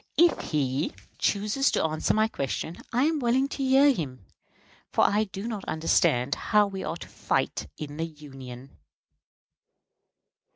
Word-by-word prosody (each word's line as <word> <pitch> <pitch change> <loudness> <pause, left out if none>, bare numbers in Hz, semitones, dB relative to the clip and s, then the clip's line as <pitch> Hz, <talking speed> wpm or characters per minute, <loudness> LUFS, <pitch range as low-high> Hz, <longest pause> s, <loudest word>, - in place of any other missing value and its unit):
If 345 0 +3
he 140 0 0 0.2
chooses 210 +7 +1
to - - +2
answer 155 -1 +1
my 215 0 +3
question, 160 - -3
I 245 +3 +2
am 315 +1 +2
willing 255 +2 +2
to - - -6
hear 270 +2 +5
him, 130 - -5 0.7
for - - +3
I 210 +2 +3
do 195 +2 -6
not 215 -4 -4
understand 155 -4 +2
how 210 -1 +3
we 195 -1 -5
are 165 - -3
to - - -10
fight - - -1
in 145 -1 -7
the 165 - -1
Union. 135 -4 -11
175 Hz, 150 wpm, -27 LUFS, 145-230 Hz, 0.7 s, hear